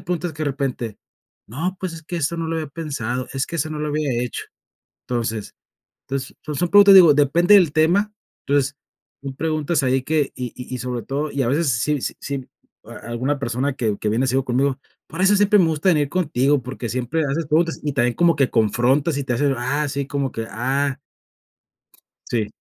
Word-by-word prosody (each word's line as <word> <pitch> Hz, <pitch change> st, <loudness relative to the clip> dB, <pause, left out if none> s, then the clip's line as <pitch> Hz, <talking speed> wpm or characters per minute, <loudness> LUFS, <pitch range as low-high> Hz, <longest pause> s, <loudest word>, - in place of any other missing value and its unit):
preguntas 175 Hz, -2 st, -3 dB
de 155 Hz, 0 st, -3 dB
repente, 130 Hz, -6 st, -3 dB, 0.5 s
no, 170 Hz, -, -3 dB
pues, 180 Hz, -3 st, -4 dB
es 165 Hz, -, -10 dB
que 175 Hz, +2 st, -5 dB
eso 165 Hz, +1 st, -1 dB
no 165 Hz, -1 st, -3 dB
lo 165 Hz, -, -1 dB
había 155 Hz, -1 st, -3 dB
pensado, 130 Hz, -5 st, -4 dB
es 135 Hz, 0 st, -1 dB
que 170 Hz, -, -5 dB
eso 155 Hz, +1 st, -1 dB
no 155 Hz, -, -4 dB
lo 150 Hz, -, -2 dB
había 150 Hz, -2 st, -1 dB
hecho. 125 Hz, -, -5 dB, 0.6 s
Entonces 115 Hz, -3 st, -3 dB, 0.6 s
entonces, 135 Hz, -1 st, -4 dB, 0.2 s
son 175 Hz, -, 0 dB
preguntas, 200 Hz, 0 st, +8 dB
digo, 170 Hz, -5 st, +9 dB
depende 160 Hz, +7 st, +4 dB
del 180 Hz, -7 st, +5 dB
tema, 180 Hz, +7 st, +2 dB, 0.3 s
entonces 140 Hz, 0 st, +1 dB, 0.5 s
tú 135 Hz, -1 st, -6 dB
preguntas 155 Hz, 0 st, 0 dB
ahí 130 Hz, 0 st, +2 dB
que, 150 Hz, -1 st, 0 dB
y 125 Hz, -2 st, -5 dB
y 125 Hz, 0 st, -8 dB
y -, -, -3 dB
sobre 125 Hz, -2 st, -4 dB
todo, 145 Hz, +3 st, -2 dB
y 140 Hz, -1 st, -1 dB
a -, -, 0 dB
veces 145 Hz, +4 st, +1 dB
si 135 Hz, +4 st, 0 dB
si 135 Hz, -2 st, -5 dB, 0.4 s
a -, -, -11 dB, 0.2 s
alguna 130 Hz, +5 st, -1 dB
persona 130 Hz, +2 st, -1 dB
que 110 Hz, -6 st, -1 dB
que 105 Hz, -, -1 dB
viene 115 Hz, +5 st, +1 dB
sido 130 Hz, +1 st, +1 dB
conmigo, 135 Hz, +2 st, 0 dB, 0.3 s
por 165 Hz, +4 st, -5 dB
eso 200 Hz, +2 st, +5 dB
siempre 205 Hz, +1 st, +4 dB
me 175 Hz, -, +5 dB
gusta 160 Hz, +3 st, +1 dB
venir 150 Hz, -5 st, +2 dB
contigo, 145 Hz, -5 st, +1 dB
porque 125 Hz, -1 st, -5 dB
siempre 130 Hz, +7 st, -1 dB
haces 145 Hz, +3 st, -1 dB
preguntas, 165 Hz, +2 st, +1 dB
y 145 Hz, -2 st, -2 dB
también 120 Hz, -2 st, +1 dB
como 170 Hz, -2 st, +3 dB
que 135 Hz, -3 st, +2 dB
confrontas 125 Hz, +7 st, +2 dB
y 140 Hz, -, -2 dB
te 125 Hz, -, -1 dB
haces, 140 Hz, +3 st, +1 dB
ah, 145 Hz, +5 st, -1 dB
sí, 140 Hz, 0 st, -3 dB
como 140 Hz, -2 st, -2 dB
que, 115 Hz, 0 st, -5 dB
ah. 135 Hz, +4 st, -1 dB, 1.3 s
Sí, 110 Hz, -3 st, -1 dB
140 Hz, 200 wpm, -21 LUFS, 130-160 Hz, 1.3 s, digo